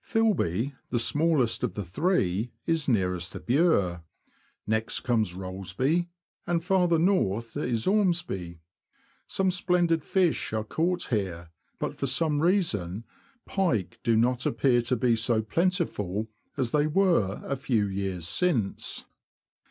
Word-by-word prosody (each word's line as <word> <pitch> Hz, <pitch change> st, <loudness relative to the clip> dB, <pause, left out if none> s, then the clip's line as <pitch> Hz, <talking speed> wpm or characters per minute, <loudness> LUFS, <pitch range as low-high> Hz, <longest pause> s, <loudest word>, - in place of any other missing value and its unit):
Filby, 145 Hz, -, +1 dB, 0.2 s
the 120 Hz, -, 0 dB
smallest 145 Hz, -1 st, +2 dB
of 115 Hz, -7 st, -1 dB
the 105 Hz, -, -3 dB
three, 110 Hz, -, 0 dB
is 165 Hz, -3 st, 0 dB
nearest 90 Hz, -6 st, 0 dB
the -, -, -6 dB
Bure; 120 Hz, -, +2 dB, 0.6 s
next 110 Hz, +1 st, -1 dB
comes 110 Hz, -7 st, 0 dB
Rollesby; 95 Hz, -, -1 dB, 0.4 s
and 170 Hz, -1 st, 0 dB
farther 180 Hz, -2 st, +3 dB
north 120 Hz, -, +1 dB
is 120 Hz, -6 st, -1 dB
Ormsby. 175 Hz, -, 0 dB, 0.7 s
Some 190 Hz, -1 st, +1 dB
splendid 175 Hz, -3 st, +1 dB
fish 180 Hz, -, +1 dB
are 110 Hz, -1 st, 0 dB
caught 170 Hz, +10 st, -1 dB
here, 90 Hz, -7 st, -2 dB, 0.3 s
but -, -, -4 dB
for -, -, 0 dB
some 155 Hz, -3 st, +1 dB
reason 115 Hz, -, +1 dB, 0.4 s
pike 115 Hz, -, -1 dB
do 115 Hz, -3 st, +2 dB
not 125 Hz, +2 st, +2 dB
appear 120 Hz, +2 st, +2 dB
to 120 Hz, +2 st, 0 dB
be 120 Hz, 0 st, +2 dB
so 115 Hz, -1 st, +1 dB
plentiful 110 Hz, -, -1 dB, 0.3 s
as 125 Hz, -4 st, -1 dB
they 150 Hz, 0 st, +2 dB
were 160 Hz, -, +2 dB
a 140 Hz, -, -1 dB
few 125 Hz, -6 st, 0 dB
years 95 Hz, -3 st, -3 dB
since. 120 Hz, -, -1 dB
125 Hz, 130 wpm, -27 LUFS, 100-170 Hz, 0.7 s, farther